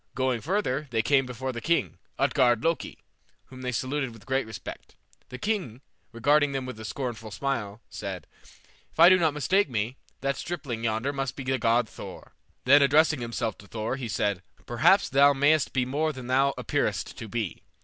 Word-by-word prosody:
Going 130 -3 0
further, 150 - -1
they 115 -2 0
came 135 +1 +3
before 130 +1 -4
the 120 -2 -6
king, 170 0 0 0.2
Utgard 120 -4 +3
Loki, 165 0 -1 0.5
whom 130 -1 -12
they 125 -1 -2
saluted 130 +3 -2
with 115 - -15
great 135 -3 0
respect. 110 -3 -9 0.3
The 130 - -7
king, 175 - -2 0.3
regarding 145 +4 +3
them 135 -1 -2
with 125 -3 -7
a 110 - -7
scornful 115 -3 -4
smile, 115 -3 -3
said, 95 -5 -6 0.7
"If - - -19
I 170 +2 +10
do 185 0 +6
not 160 -4 +2
mistake 180 +5 +2
me, 115 +2 -2 0.2
that 140 0 -1
stripling 140 -9 -5
yonder 115 +5 0
must 135 -2 -3
be 135 - -6
the 130 0 0
god 115 +1 +2
Thor." - - -10 0.3
Then 140 +3 +7
addressing 150 0 +4
himself 115 -1 -3
to 100 - -14
Thor, 110 +4 -3
he 130 -3 -5
said, 100 -3 -1 0.2
"Perhaps 160 - +4
thou 140 +1 +6
mayst 145 +2 +3
be 125 -1 +1
more 150 +5 0
than 130 -4 -9
thou 135 +2 +2
appearest - - -1
to 115 - -6
be. 110 -5 -3
130 Hz, 185 wpm, -27 LUFS, 115-145 Hz, 0.7 s, I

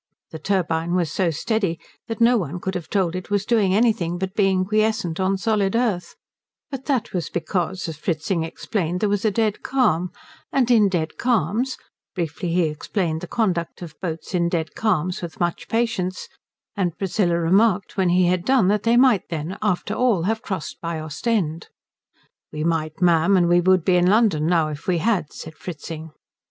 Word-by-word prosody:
The 160 - -7
turbine 170 -3 0
was 170 -4 0
so 185 0 +1
steady 175 +1 -1 0.3
that 225 0 -4
no 235 +1 +5
one 180 -5 -2
could 190 +2 -3
have 175 -4 -5
told 185 -4 0
it 185 - -6
was 205 -1 0
doing 210 -5 +2
anything 210 -6 +2
but 190 +1 -3
being 190 -3 +2
quiescent 215 -4 0
on 190 +1 +1
solid 205 -1 0
earth; 220 -7 -1 0.6
but 270 -1 -6
that 255 -5 -1
was 170 -5 -2
because, 175 +2 -2
as 160 -2 -6
Fritzing 165 +2 -1
explained, 175 +1 -2
there 210 - +1
was 205 +1 0
a - - +5
dead 215 0 0
calm, 210 -10 +1 0.4
and 250 -3 +2
in 215 -4 +5
dead 165 -4 -2
calms 240 - 0 0.4
briefly, 170 -1 -3
he 175 +1 +2
explained 160 +2 -2
the 180 - -6
conduct 180 -6 -1
of 165 -3 -8
boats 165 -1 -5
in 170 -1 +1
dead 165 -2 -2
calms 185 -5 0
with 170 -2 -7
much 175 -1 -2
patience, 225 -6 -1 0.5
and 180 -5 -1
Priscilla 185 -3 +1
remarked 190 +3 +2
when 190 -2 +2
he 180 +1 +4
had 180 0 +1
done 250 -5 +3
that 210 0 +2
they 230 +2 +3
might 245 -7 +4
then, 165 +2 -4
after 210 -4 0
all, 235 -9 +2
have 220 +4 0
crossed 190 -9 -5
by 165 -1 -3
Ostend. 160 +1 -2 0.8
"We 155 0 -4
might, 160 0 -1
ma'am, 175 +2 +4
and 175 -1 +3
we 175 0 +4
would 185 -1 +3
be 180 -1 +4
in 175 0 +3
London 195 -7 +3
now 165 -3 +2
if 150 -1 -8
we 180 -2 +2
had," 185 -4 0
said 160 - -9
Fritzing. 160 -1 -7
185 Hz, 185 wpm, -22 LUFS, 165-215 Hz, 0.8 s, no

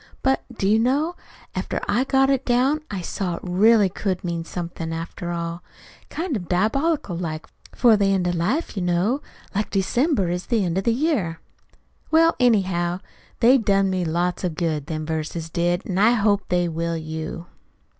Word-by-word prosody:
But, 265 0 +2
do 210 -5 -2
you 215 +2 +4
know, 285 +9 +1 0.4
after - - -2
I 240 +6 +2
got 270 0 +3
it 270 -1 +1
down 260 +5 +2
I 195 -3 -4
saw 180 0 -3
it - - -8
really 205 +3 +4
could 185 0 -3
mean 170 -2 -2
somethin', 170 -1 -5
after 165 +1 -5
all 170 0 -3 0.5
kind 330 -3 -3
of 180 -6 -4
diabolical 220 - +1
like 160 -2 -4 0.3
for 235 -3 +5
the 200 -1 +2
end 190 -2 +1
of 175 - +1
life, 210 - -1
you 195 - -2
know, 180 +10 +1 0.3
like 205 +1 -1
December 210 - +1
is 180 +1 -3
the 225 -5 +1
end 175 +1 0
of 195 - -5
the 235 - +4
year. 230 - 0 0.7
"Well, 330 +1 +4
anyhow, 185 -7 +2 0.4
they 255 +3 +6
done 195 -3 +2
me 185 -1 0
lots 175 +3 -1
of 175 -4 -1
good, 155 -4 -2
them 155 -2 -3
verses 160 +1 -4
did, 175 +2 0
an' 185 -1 -1
I 220 +4 +5
hope 205 -3 +1
they 175 -1 +2
will 165 0 -2
you." 160 +1 -5
190 Hz, 180 wpm, -23 LUFS, 170-235 Hz, 0.7 s, they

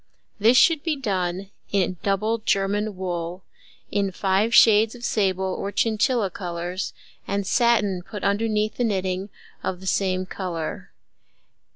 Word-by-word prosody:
This 230 +4 +5
should 320 +1 +5
be 320 -1 -1
done 190 -6 -2 0.2
in 185 -2 +1
double 210 +3 0
German 205 0 0
wool, 175 -1 -4 0.5
in 200 -1 0
five 195 +4 +1
shades 220 0 +6
of 240 0 -7
sable 190 -2 0
or 200 - -4
chinchilla 220 0 +1
colours, 175 +1 -4 0.4
and 200 0 -1
satin 210 -5 +2
put 205 +3 -8
underneath 215 +1 0
the 245 - +1
knitting 190 -2 -1 0.3
of 185 -2 -3
the 190 - -11
same 185 -1 0
colour. 175 -4 -5
195 Hz, 135 wpm, -24 LUFS, 185-215 Hz, 0.5 s, shades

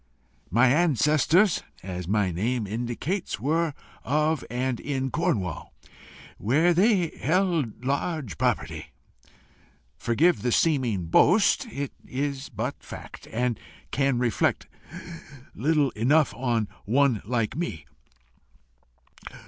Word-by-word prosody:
"My 120 +7 +4
ancestors, 155 - +3 0.2
as 90 -2 -5
my 100 -1 +1
name 110 +7 -1
indicates, 120 - -3
were 155 +4 0 0.3
of 155 +2 +1
and 125 0 -2
in 135 -2 -2
Cornwall, 120 - -2 0.6
where 155 +11 +3
they 185 -2 +3
held 160 - -1
large 140 - -2
property. - - -1 1.1
Forgive 155 +9 +2
the 125 - 0
seeming 125 - +1
boast 200 - +4
it 140 - -4
is 140 +1 -3
but - - -4
fact, - - -10
and 120 0 -1 0.3
can 135 -2 +1
reflect 120 -3 +1 0.9
little 145 +2 +1
enough 140 +8 +2
on 120 -4 0 0.2
one 125 0 +2
like 115 0 -1
me. 155 - -4
135 Hz, 100 wpm, -26 LUFS, 115-160 Hz, 1.1 s, My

